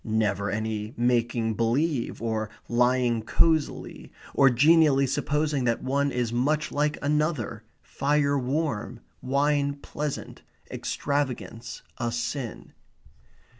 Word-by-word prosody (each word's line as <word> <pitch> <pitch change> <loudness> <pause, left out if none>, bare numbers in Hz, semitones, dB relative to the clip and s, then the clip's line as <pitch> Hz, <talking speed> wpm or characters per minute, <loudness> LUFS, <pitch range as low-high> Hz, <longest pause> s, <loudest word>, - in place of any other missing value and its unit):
Never 105 -2 0
any 110 +2 -3
making 120 -2 +1
believe, 120 +3 0
or 110 -2 -1 0.2
lying 125 -1 +2
cosily, 155 +7 0 0.2
or 135 -1 +6
genially 145 +2 +5
supposing 145 +1 0
that 115 -1 0
one 140 +2 +1
is 120 -2 -1
much 150 +5 0
like 150 +1 0
another, 150 -7 0 0.2
fire 145 0 +1
warm, 135 -3 -2 0.2
wine 140 +1 +1
pleasant, 145 0 -5 0.3
extravagance 130 -4 -3 0.2
a 120 -1 -1
sin. 120 +1 -4
130 Hz, 100 wpm, -26 LUFS, 115-145 Hz, 0.3 s, or